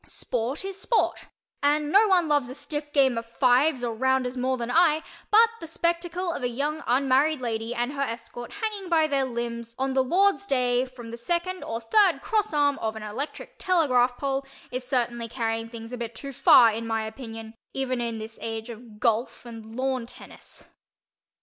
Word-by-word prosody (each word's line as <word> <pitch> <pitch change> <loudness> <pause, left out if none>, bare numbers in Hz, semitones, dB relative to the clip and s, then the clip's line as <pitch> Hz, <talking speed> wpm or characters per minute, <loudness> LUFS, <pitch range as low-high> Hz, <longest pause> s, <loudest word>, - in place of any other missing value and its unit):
Sport 250 +8 -3
is 390 0 -4
sport, 470 - 0 0.3
and 295 +1 +2
no 415 +4 +6
one 360 -4 +3
loves 290 -5 +1
a 255 - -7
stiff 295 0 -5
game 265 -5 +3
of 230 - -9
"fives" 255 +3 +3
or 235 -1 -1
"rounders" 260 +1 +1
more 260 +1 0
than 235 0 -3
I, 320 -1 +4 0.3
but 450 +2 +7
the 330 - -8
spectacle 345 +2 -1
of - - -5
a 245 - 0
young 295 +5 -2
unmarried 270 +4 +3
lady 230 -1 -3
and 245 +3 -1
her 280 - -3
escort 240 -1 -5
hanging 410 -4 -3
by 325 -2 +4
their 280 -3 +1
limbs 235 -1 -4
on 265 0 -1
the 265 - +3
Lord's 395 +7 +2
Day 250 -4 +2
from 240 -3 -10
the 235 - -6
second 345 +8 -2
or 230 - -4
third 365 - +3
cross 430 -2 0
arm 290 -2 +2
of 220 -1 -2
an 220 - -7
electric 230 +8 -6
telegraph 255 -9 +2
pole 275 -1 -1 0.3
is 255 0 -3
certainly 240 -3 -1
carrying 225 -1 -2
things 230 0 -9
a - - -3
bit 235 -1 -5
too 275 +5 -7
far, 240 -2 +7
in 225 +1 -4
my 225 -1 -1
opinion, 225 -1 -8 0.2
even 255 -2 -1
in 230 -1 -2
this 220 +1 -8
age 225 +1 -5
of 225 -2 -12
"golf" 230 +2 0
and 225 -1 -10
lawn 260 -2 -1
"tennis." - - -12
255 Hz, 190 wpm, -26 LUFS, 235-300 Hz, 0.3 s, but